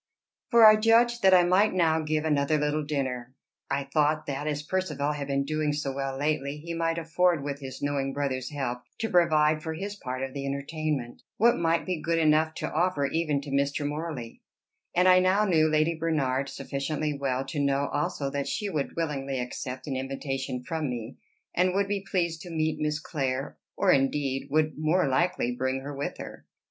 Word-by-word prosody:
For 235 -3 +7
I 215 0 +9
judged 235 +2 +4
that 190 -1 +6
I 180 - +6
might 185 +4 +3
now 160 -3 +3
give 155 0 -1
another 150 0 +2
little 150 +1 0
dinner: 130 -4 -3 0.3
I 140 - 0
thought, 150 +2 +1
that, 140 +2 -3
as 150 0 -2
Percivale 150 -4 -1
had 145 -2 -4
been 140 0 0
doing 155 0 0
so 145 -2 -2
well 135 0 -3
lately, 145 0 -1
he 170 +3 -6
might 165 0 0
afford, 170 -1 +1
with 140 0 -4
his 135 -1 -8
knowing 140 -1 0
brother's 130 -2 -2
help, 130 -4 -3 0.2
to 225 -1 -3
provide, 155 -3 +4
for 160 0 -4
his 200 +5 -5
part 130 -8 -5
of 135 -1 -4
the 140 - -4
entertainment, 140 -2 -3 0.2
what 235 +3 +5
might 165 0 +1
be 180 -4 -2
good 165 +1 0
enough 155 0 +3
to - - -4
offer 175 -6 +1
even 150 -1 0
to 140 0 -8
Mr. 140 +1 0
Morley; 150 -6 -5 0.5
and 180 +1 +4
I 185 0 +7
now 190 +3 +3
knew 160 -5 +3
Lady 155 +1 +2
Bernard 140 -5 -1
sufficiently 145 +2 -3
well 135 -1 -1
to 145 +2 -4
know 140 0 +1
also 145 -1 -1
that 140 0 -2
she 210 -2 -2
would 150 -5 -2
willingly 140 -5 -2
accept 125 +1 -5
an 140 - -3
invitation 135 -1 -4
from 155 +1 -2
me, 120 -1 -6 0.3
and 180 +1 +2
would 200 0 +2
be 200 -1 -2
pleased 170 -4 0
to 180 - -9
meet 160 -1 -1
Miss 150 0 -1
Clare, 135 -4 -3 0.2
or, - - +4
indeed, 135 0 +1
would 155 +1 +1
more 155 +2 +2
likely 130 -3 +1
bring 130 +1 -1
her 140 +1 -6
with 140 +1 -4
her. - - -9
150 Hz, 195 wpm, -27 LUFS, 135-165 Hz, 0.5 s, I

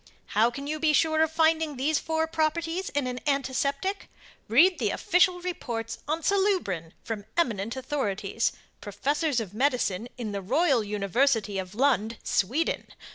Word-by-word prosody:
How 220 +3 +4
can 275 +4 -7
you 305 +1 -3
be 310 -1 +3
sure 315 +1 +3
of 320 -1 +2
finding 320 -2 +2
these 300 +4 +1
four 320 0 0
properties 330 +3 -1
in 285 -2 -1
an 250 0 -3
antiseptic? 280 +6 -1 0.4
Read 315 - +5
the 220 -5 +1
official 360 - +2
reports 235 -11 -4
on 315 +2 -1
SALUBRIN 370 - 0
from 215 -3 -5
eminent 230 - 0
authorities, 230 -6 -1 0.3
professors 275 - -1
of 205 -4 -6
Medicine 240 -4 0
in 230 -4 -4
the 200 -1 -3
Royal 265 - +2
university 210 +1 +1
of 185 +1 -6
Lund, 235 -4 +1
Sweden. 260 - 0
275 Hz, 145 wpm, -27 LUFS, 220-320 Hz, 0.4 s, Read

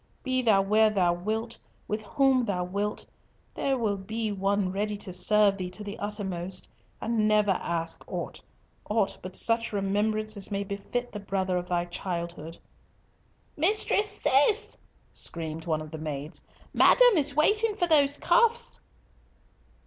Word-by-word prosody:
Be 255 -1 0
thou 210 -5 +4
where 215 +2 +4
thou 185 -5 +2
wilt, 220 +6 -3 0.3
with 210 +1 -2
whom 265 +3 +2
thou 195 -5 -1
wilt, 200 +3 -3 0.5
there 270 -1 0
will 215 -4 0
be 215 +3 -3
one 195 -1 0
ready 205 +2 -2
to 195 -2 -6
serve 205 +2 +3
thee 180 -1 -3
to 210 +3 -8
the 205 +1 -7
uttermost, 190 -3 -4 0.3
and 225 -2 0
never 210 -1 +3
ask 170 -2 -2
aught—aught 210 -2 -4
but 185 +1 -8
such 230 0 +1
remembrance 215 +2 -1
as 200 -2 -3
may 200 0 -2
befit 200 +5 -4
the 210 - -6
brother 190 -2 -2
of 180 0 -2
thy 175 -1 0
childhood—" 170 -2 -5 1.0
"Mistress 415 +5 +2
Cis," 350 - +2 0.4
screamed 160 0 -5
one 155 -1 0
of 155 - -11
the 160 - -7
maids, 150 +1 -5 0.3
"madam - - +6
is 290 -3 +1
waiting 425 +8 +3
for 355 - +2
those 290 -4 +4
cuffs." 470 0 +2
205 Hz, 145 wpm, -27 LUFS, 185-235 Hz, 1.0 s, madam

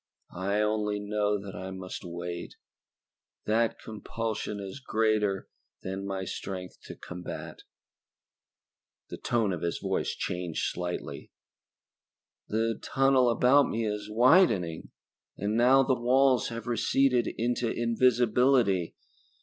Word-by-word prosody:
"I 100 +4 0
only 105 -1 0
know 105 0 0
that 100 -1 -8
I 95 +1 -6
must 95 -1 -7
wait 85 0 -6 0.9
that 115 +2 +1
compulsion 110 -1 -4
is 100 +5 -7
greater 110 -5 0 0.4
than 95 +1 -4
my 95 -1 -3
strength 90 0 -6
to - - -8
combat." 90 0 -8 1.5
The - - -6
tone 115 -5 0
of 85 - -5
his 85 - -1
voice - - -2
changed 90 -2 -3
slightly. 90 0 -5 1.2
"The 115 +1 -1
tunnel 135 -2 +3
about 125 +4 +4
me 115 0 -1
is 105 0 -3
widening 110 - +3 0.5
and 105 +3 -1
now 130 +3 +5
the 130 - +2
walls 130 0 +3
have 115 -1 -6
receded 125 0 +2
into 120 0 0
invisibility. 120 -4 +2
110 Hz, 115 wpm, -28 LUFS, 95-120 Hz, 1.5 s, now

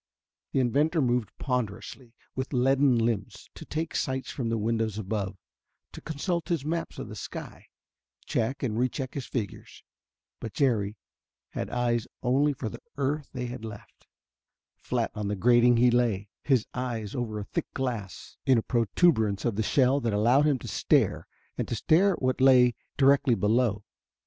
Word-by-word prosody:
The - - +1
inventor 145 +7 +2
moved 120 -5 +1
ponderously, 125 0 -4 0.2
with 130 +2 -4
leaden 135 0 +3
limbs, 115 -3 -2
to - - -10
take 160 +1 -3
sights 130 0 -2
from 120 -4 -3
the 115 - 0
windows 110 -1 -1
above, 100 -2 -3 0.5
to - - -10
consult 170 +3 -3
his 165 -5 -1
maps 165 +2 -3
of - - -6
the - - -8
sky, - - -8 0.6
check 120 +5 -1
and 115 -3 -1
re 125 +1 +2
check 130 -2 -5
his 140 - -5
figures. 110 -7 -5 0.6
But 110 - -6
Jerry 110 -7 +1 0.5
had - - -4
eyes 120 -2 0 0.2
only 135 +4 +3
for 130 -4 -5
the - - -8 0.2
earth 140 +1 -1
they 125 -2 -3
had 120 -2 -6
left. 105 -2 -10 0.7
Flat - - -2
on 105 -1 -3
the 105 - -1
grating 120 +3 +5
he 120 +1 +5
lay, 110 -5 +1
his 130 -6 +2
eyes 120 -5 -3
over 115 -4 -3
a 105 - -3
thick - - -4
glass 115 -7 -4
in 130 -2 +4
a 115 - +1
proturbance 110 - +2
of 115 -4 0
the 110 - 0
shell 130 +4 +3
that 115 -4 -1
allowed 120 +8 +4
him 145 -3 +3
to - - -9
stare - - +1 0.3
and - - -2
stare 165 - +3
at 170 - -7
what 130 0 +1
lay 125 -2 +6 0.2
directly 135 -2 +4
below. 105 0 +1
125 Hz, 170 wpm, -27 LUFS, 110-135 Hz, 0.7 s, lay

